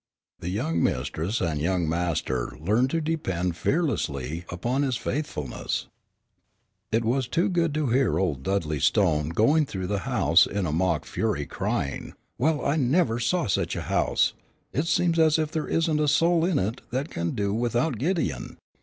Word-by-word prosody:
The 90 - -4
young 85 -4 -1
mistress 80 - -1
and 80 -5 -1
young 90 0 +1
master 80 -7 -1
learned 110 +11 +2
to 165 +3 0
depend 95 - -1
fearlessly 85 - -1
upon 120 +10 -1
his 130 -4 0
faithfulness. 130 - -3 1.0
It 115 +1 +1
was 125 +2 +1
good 170 -1 +1
to 155 -1 0
hear 125 -2 +2
old 80 -9 0
Dudley 80 -3 -1
Stone 75 +3 +2
going 140 - +3
through 95 -5 -4
the 100 +2 -1
house 85 +5 +4
in 100 -2 -2
a 80 - -1
mock 80 -1 0
fury, 105 -11 -1
crying, 70 0 -3 0.3
"Well, 150 +3 +1
I 145 +3 +2
never 135 -3 +2
saw 150 +7 +1
such 100 - 0
a - - -3
house; - - +1 0.4
it 150 +4 0
seems 165 0 +2
as 155 -1 +5
if 155 -1 -1
there 160 -2 -2
isn't 160 -2 +1
a 150 - +2
soul 165 +3 +3
in 175 -4 +1
it 105 +6 -1
that 135 +5 -3
can 85 0 -2
do 100 -1 0
without 120 +2 0
Gideon. 170 +6 -2
115 Hz, 165 wpm, -26 LUFS, -, 1.0 s, as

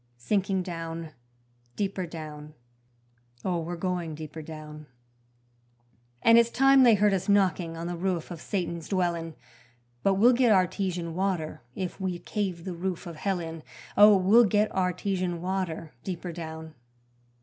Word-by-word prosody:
Sinking 190 - 0
down, 165 -2 -6 0.6
deeper 195 -3 -2
down, 155 -2 -9 0.9
Oh, 180 -2 0
we're 170 +2 -4
going 175 -2 -3
deeper 155 +1 -8
down: 150 -1 -9 1.4
And 230 0 +7
it's 235 0 +3
time 270 +2 +5
they 240 -4 +7
heard 205 0 +3
us 190 +1 -1
knocking 180 -5 +2
on 165 - -5
the 175 0 -3
roof 180 -1 -2
of 165 -3 -7
Satan's 170 -4 -3
dwellin'; 170 -4 -1 0.7
But 195 +7 +3
we'll 235 +6 +6
get 245 -2 +4
artesian 185 -3 +1
water 175 -4 -2
if 185 +1 -5
we 185 -2 -1
cave 185 -3 -3
the 185 - -4
roof 180 +2 -4
of 170 -3 -8
hell 190 +3 -1
in 165 -1 -6 0.3
Oh! 210 0 +8
we'll 210 +6 +6
get 210 +1 +2
artesian 180 -1 -1
water 180 -3 -3
deeper 180 -1 -5
down. 160 -1 -7
180 Hz, 145 wpm, -27 LUFS, 165-195 Hz, 1.4 s, Oh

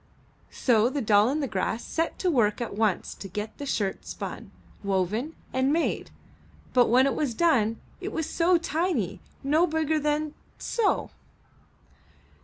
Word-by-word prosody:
So 230 -2 +3
the 285 +2 -2
Doll 210 -2 +4
i' 290 +3 0
the 275 - -1
Grass 215 +2 -2
set 330 0 -1
to 365 - +1
work 215 -7 +2
at 235 -4 -4
once 210 -3 0
to 195 - -9
get 210 +3 -6
the 285 - -5
shirt 200 -7 -1
spun, - - -6 0.3
woven, 200 - -1 0.2
and 260 +1 +2
made, 330 +2 0 0.6
but 245 -1 +5
when 255 +3 +5
it 275 - +2
was 270 -7 -1
done, 230 -10 +2 0.2
it - - -4
was 320 - -2
so 345 +1 +3
tiny, 335 +2 -1 0.2
no 310 +6 +3
bigger 315 -1 +1
than 300 0 0 0.2
— - - -34 0.2
so. 450 -4 +1
265 Hz, 160 wpm, -27 LUFS, 215-315 Hz, 0.6 s, but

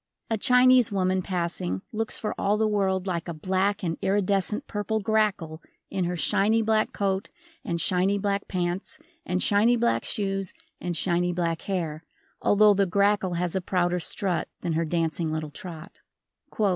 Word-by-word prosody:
A 225 - +2
Chinese 250 0 +5
woman 185 -1 +1
passing 170 - -3
looks 225 0 -2
for 215 - -2
all 205 +1 +1
the 220 0 +2
world 190 -3 0
like 170 -3 -3
a 170 - -4
black 190 +5 0
and 165 -2 -2
iridescent 200 +4 +1
purple 215 +1 -2
grackle 200 -7 0 0.3
in 190 -2 -1
her 175 +1 -2
shiny 210 +8 +2
black 220 0 +1
coat 195 0 -1 0.3
and 170 0 -2
shiny 190 +3 +2
black 200 0 -1
pants 180 - -3 0.3
and 180 0 0
shiny 215 +4 +4
black 235 0 +1
shoes 195 -3 -2 0.3
and 175 -2 -3
shiny 175 +1 +1
black 170 -2 -1
hair, 165 -5 -3 0.4
although 210 0 +5
the 200 -1 +2
grackle 200 -1 +2
has 175 0 -2
a 190 - 0
prouder 180 -1 0
strut 180 +1 -1
than 170 - -2
her 165 +1 0
dancing 165 0 -1
little 155 -1 -3
trot. 165 0 -10
190 Hz, 160 wpm, -26 LUFS, 175-205 Hz, 0.4 s, Chinese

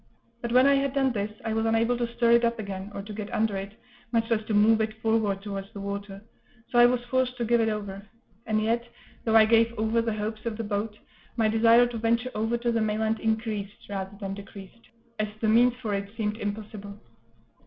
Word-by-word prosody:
But 235 - -3
when 255 +2 +6
I 280 - +6
had 275 0 0
done 270 -1 +2
this, 205 -2 -2 0.2
I 220 - -1
was 225 0 0
unable 225 +2 +2
to 235 -1 -1
stir 235 0 +3
it 235 0 +5
up 235 0 +1
again, 200 -2 -6
or 200 - -5
to 210 +1 -8
get 210 0 -6
under 215 -2 0
it, 195 +1 -5 0.4
much 230 0 0
less 220 -1 +2
to 220 - -1
move 220 +2 +5
it 220 0 -3
forward 220 -3 0
towards 195 -1 -6
the 200 - -7
water; 200 0 -6 0.5
so 240 - +3
I 240 - +9
was 245 0 -1
forced 255 0 0
to 240 - -1
give 235 +1 +3
it 225 - +2
over; 205 -2 -4 0.5
and 215 -1 +1
yet, 230 +2 +1 0.4
though 225 -1 +2
I 220 -1 +8
gave 230 +1 +3
over 220 +2 +1
the 225 -2 -2
hopes 215 +1 -4
of 220 -2 -3
the 230 - -3
boat, 210 0 -3 0.4
my 225 -2 +3
desire 230 +2 +5
to 240 -1 -4
venture 235 +3 +1
over 225 +2 0
to 235 0 -1
the 230 -1 +1
mainland 220 +1 0
increased, 220 -2 -3
rather 195 0 -5
than 195 -2 -4
decreased, 200 +2 -12 0.3
as 215 - +1
the 220 - 0
means 240 +2 +5
for 230 -5 -4
it 200 0 -3
seemed 210 -1 -1
impossible. 205 -1 -6
220 Hz, 225 wpm, -27 LUFS, 205-235 Hz, 0.5 s, I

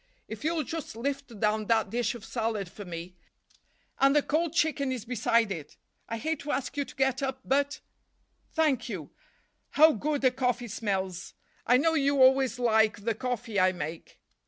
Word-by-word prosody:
If 220 +3 -8
you'll 320 0 0
just 320 -4 -6
lift 270 -2 -4
down 215 0 +1
that 225 -1 +2
dish 240 0 0
of 225 -3 -10
salad 220 -6 -2
for 205 - -9
me—and 180 - -4
the 295 - +4
cold 325 +1 0
chicken 305 -5 +1
is 245 -4 -4
beside 230 -2 +1
it. 160 -6 -7 0.3
I 230 - -2
hate 315 +5 -2
to 290 - -4
ask 270 0 -2
you 285 -1 -1
to - - -13
get 265 0 +1
up, 265 -1 -2
but—Thank 285 -1 -2
you. 175 -9 -6 0.6
How 315 +2 +6
good 290 +4 -1
the 260 -2 +4
coffee 245 -2 -1
smells! 190 -4 -3 0.3
I 250 - +6
know 320 +5 +2
you 280 -2 +2
always 260 -1 +5
like 220 -3 +2
the 230 +1 +1
coffee 240 -2 -2
I 185 0 +4
make." 160 -1 -7
245 Hz, 170 wpm, -28 LUFS, 215-280 Hz, 0.6 s, How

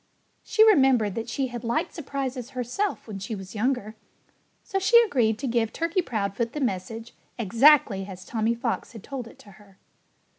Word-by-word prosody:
She 440 - +4
remembered 265 - +4
that 225 +2 -5
she 260 +2 -2
had 240 -1 -7
liked 235 0 -1
surprises 270 -5 -5
herself 255 - -2
when 205 -3 -6
she 195 +3 -5
was 190 -1 -9
younger. 220 -1 -1 0.7
So 390 - -2
she 430 +5 +6
agreed 240 - +1
to 275 - -5
give 230 -2 0
Turkey 335 +3 0
Proudfoot 225 - -2
the 300 - -4
message 225 -1 -3 0.2
exactly 230 -2 +4
as 185 -1 -10
Tommy 225 0 0
Fox 235 +1 -3
had 225 - -10
told 265 -4 -6
it - - -15
to 205 - -16
her. 195 -2 -21
235 Hz, 175 wpm, -25 LUFS, 215-275 Hz, 0.7 s, she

